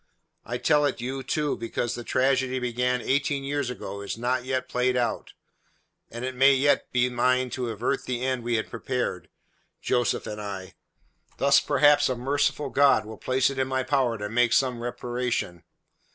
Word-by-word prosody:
I 120 +1 -4
tell 145 +4 +3
it 140 - -1
you, 130 +3 -4
too, 150 +3 -1
because 115 0 -3
the 120 - -6
tragedy 130 +1 +1
begun 125 0 0
eighteen 140 +1 0
years 140 -2 -2
ago 100 -5 -6
is 100 - -5
not 125 +2 -1
yet 130 0 -2
played 125 0 0
out, 120 -2 -2 0.8
and 120 +2 -6
it 130 - -3
may 135 +2 +5
yet 140 +2 +2
be 125 0 +2
mine 125 +1 +1
to 125 -2 -3
avert 115 +2 -2
the 125 -1 -3
end 130 -2 -1
we 120 0 0
had 110 - -1
prepared 115 -8 -3 0.5
Joseph 120 -2 0
and 105 0 -6
I. 95 -2 -6 0.6
Thus 140 0 +5
perhaps 145 0 +4
a 130 - 0
merciful 135 +2 -1
God 140 -5 +4
will 110 0 -9
place 130 +1 +1
it 135 - -5
in 130 - +1
my 130 0 -1
power 130 -3 +1
to 105 0 -4
make 120 +2 +2
some 125 -3 +1
reparation. 120 -7 -3
125 Hz, 180 wpm, -26 LUFS, 120-135 Hz, 0.8 s, may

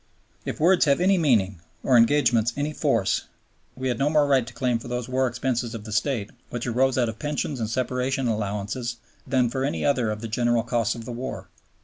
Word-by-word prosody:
If - - -4
words 180 +2 +4
have 140 0 +3
any 185 +1 +3
meaning, 100 - +2 0.2
or 130 - +3
engagements 120 -2 +4
any 145 +2 -1
force, 120 -11 +1 0.5
we 130 0 -3
had 125 -2 -1
no 140 +2 +2
more 150 -1 +4
right 135 -4 +2
to - - -7
claim 125 -3 0
for - - -10
those 125 -1 -3
war 130 0 +1
expenses 120 -1 -2
of 110 - -7
the 110 - -8
State, 105 -1 -1 0.2
which 120 -1 -4
arose 130 +2 +1
out 125 -2 +2
of 110 -1 -6
Pensions 145 -2 -2
and 110 -2 -2
Separation 130 +2 -1
Allowances, 105 +3 -2 0.3
than 130 -2 +2
for 130 +3 -2
any 140 - -1
other 130 -6 +2
of 105 0 -4
the 115 - -4
general 120 +1 +1
costs 115 -1 0
of 115 -1 -8
the 125 - -6
war. 120 +2 -6
125 Hz, 215 wpm, -25 LUFS, 115-135 Hz, 0.5 s, words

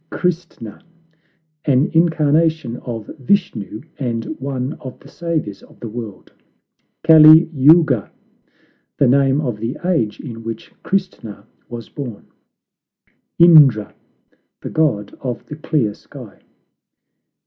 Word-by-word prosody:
CHRISTNA 170 - -4 0.8
An 140 0 +2
incarnation 160 -5 +1
of 115 -4 -7
Vishnu, 125 - -1 0.2
and 115 -4 -3
one 130 0 -4
of 130 - -10
the - - -17
saviours 160 - -4
of - - -20
the 120 - -7
world. 110 -4 -9 0.7
CALI 160 +1 +7
YOUGA 145 -4 +4 0.9
The 140 - +3
name 135 +2 +2
of 120 -8 -4
the 115 +3 -4
age 160 - -1
in 115 -5 -9
which 115 -1 -8
Christna 125 - -4 0.2
was 120 -2 -8
born. 125 -8 -8 1.1
INDRA 150 - +6 0.7
The - - -7
god 125 -11 -1
of 125 -3 -5
the 150 - -8
clear 150 -8 -1
sky. - - -14
135 Hz, 110 wpm, -18 LUFS, 115-160 Hz, 1.1 s, CALI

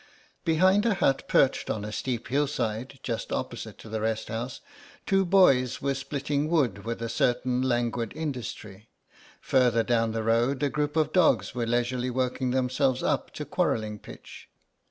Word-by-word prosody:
Behind 185 +5 +4
a 215 - +2
hut 135 -6 +1
perched 135 - +2
on 105 -1 -2
a 105 - -5
steep 120 +1 -3
hillside, 135 -3 -1
just 115 -3 -4
opposite - - -4
to - - -12
the 110 0 -3
rest 110 0 -2
house, 120 +3 -4 0.5
two 195 0 +3
boys 140 -10 +4
were 140 0 0
splitting 140 +2 -2
wood 125 - +1
with 115 0 -4
a - - -1
certain 125 +2 0
languid 120 -2 0
industry; 115 -8 -6 0.5
further 125 -3 +3
down 115 -1 +1
the 110 0 -2
road 120 +5 +1
a 145 - +2
group 150 +1 -2
of 155 - +1
dogs 180 -4 +3
were 120 -2 -2
leisurely 120 +1 0
working 130 0 -1
themselves 130 +1 +1
up - - 0
to - - -5
quarrelling 105 -1 -1
pitch. - - -12
125 Hz, 160 wpm, -27 LUFS, 115-140 Hz, 0.5 s, Behind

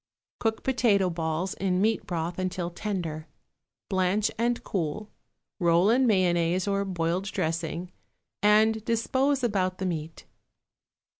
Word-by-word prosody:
Cook 225 -1 -1
potato 210 -8 +2
balls 165 +2 -2
in 185 -1 0
meat 220 +2 +1
broth 170 0 -3
until 180 -1 -2
tender; 170 -5 -4 0.6
blanch 190 +2 +1
and 235 +1 0
cool, 190 +3 -3 0.5
roll 175 +3 +4
in 255 +2 +3
mayonnaise 180 -2 +2
or 200 0 +1
boiled 175 0 -1
dressing, 165 -1 -3 0.5
and 215 +1 +4
dispose 260 +4 +1
about 185 -5 0
the 190 - -3
meat. 160 -3 -4
185 Hz, 120 wpm, -27 LUFS, 170-215 Hz, 0.6 s, roll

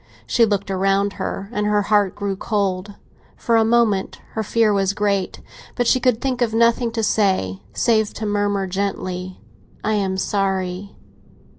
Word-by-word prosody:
She 175 - +3
looked 200 -1 -1
around 195 +1 +1
her, 195 - -3
and 210 -3 -1
her 210 0 +2
heart 205 -2 +2
grew 200 -1 -2
cold; 200 -1 -2 0.4
for 235 - +1
a 225 - +5
moment 220 -4 +2
her 220 - -2
fear 220 0 +2
was 195 -1 +1
great. 200 -2 -1 0.3
But 245 - 0
she 255 - +3
could 250 -3 +2
think 255 -2 -2
of 225 -2 +1
nothing 235 +1 +3
to 225 -1 -1
say, 190 - +1
save 220 - +2
to 220 - -4
murmur 205 -1 0
gently, 185 -1 -3 0.4
"I 215 - 0
am 195 -2 0
sorry." 190 -1 -2
205 Hz, 160 wpm, -21 LUFS, 195-220 Hz, 0.4 s, a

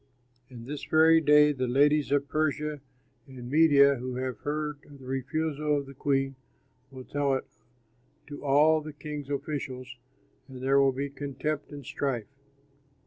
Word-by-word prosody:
And 120 -3 -11
this 145 +2 -6
very 160 +1 +5
day 150 0 +6
the 130 -3 -2
ladies 145 +3 +3
of 145 0 +1
Persia 150 -1 -1 0.5
and 125 -2 -9
Media 140 -3 +5
who 125 +1 -5
have 130 -3 -4
heard 150 0 -3
of 145 - -14
the 130 - -14
refusal 150 +3 -1
of 140 - -3
the 135 - -11
queen 135 0 0 0.6
will 130 -1 -10
tell 140 0 0
it 130 - -4 0.8
to 145 0 -9
all 150 +3 +4
the 155 0 -8
king's 150 -1 -7
officials, 135 -3 -5 0.5
and 130 -2 -10
there 135 +1 +4
will 135 -1 +4
be 140 +2 -4
contempt 145 +2 -4
and 145 -2 -9
strife! 125 -6 -2
140 Hz, 155 wpm, -28 LUFS, 135-150 Hz, 0.8 s, day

